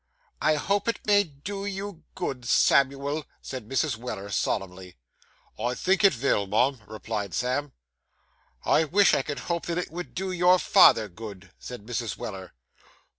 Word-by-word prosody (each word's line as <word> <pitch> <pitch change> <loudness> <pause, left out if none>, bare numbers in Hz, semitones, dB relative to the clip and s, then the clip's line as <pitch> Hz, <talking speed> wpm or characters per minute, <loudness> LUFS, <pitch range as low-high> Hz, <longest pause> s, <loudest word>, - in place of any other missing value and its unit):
'I 155 - +3
hope 200 +8 0
it 230 - -2
may 205 -1 +5
do 190 +5 -7
you 200 -3 -5
good, 135 -9 -4
Samuel,' 140 +2 +3 0.2
said 125 -5 -8
Mrs. 135 -2 0
Weller 105 -4 -6
solemnly. 95 -3 -3 0.6
'I 120 +3 -1
think 190 +7 +1
it 195 - +8
vill, 115 -6 0
mum,' 125 +5 +1
replied 105 -3 -4
Sam. 130 +3 -1 0.9
'I 160 - +4
wish 195 +5 +4
I - - +3
could 145 +1 -5
hope 170 -1 -3
that 170 0 -2
it 180 - -3
would 175 +2 -7
do 190 +1 -2
your 180 0 +5
father 110 - +6
good,' 100 -1 -10
said 125 -5 -9
Mrs. 120 -1 -3
Weller. 95 - -7
140 Hz, 155 wpm, -26 LUFS, 110-180 Hz, 0.9 s, it